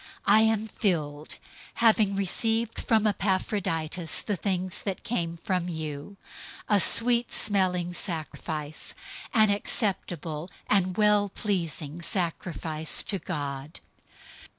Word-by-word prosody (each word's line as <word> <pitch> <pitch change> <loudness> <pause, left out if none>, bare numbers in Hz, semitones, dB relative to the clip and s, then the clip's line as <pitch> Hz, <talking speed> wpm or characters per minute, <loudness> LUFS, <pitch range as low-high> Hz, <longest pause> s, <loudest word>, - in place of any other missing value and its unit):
I 210 +2 +6
am 220 0 +2
filled, 155 -9 -2 0.4
having 215 -3 +4
received 225 +4 +1
from 220 -2 +2
Epaphroditus 185 -5 0
the 205 - -1
things 185 0 -1
that 195 -2 -4
came 170 -8 -2
from 180 0 -1
you, 155 +3 -6 0.5
a 205 -2 +4
sweet 235 +5 +3
smelling 180 -3 +1
fragrance, 155 -3 -4 0.4
an 215 -2 +5
acceptable 175 - -2 0.2
and 185 -3 +1
well 210 -1 +4
pleasing 170 -6 -2
sacrifice 165 -3 -1
to 195 - -3
God. 145 -3 -5
185 Hz, 105 wpm, -27 LUFS, 160-210 Hz, 0.5 s, I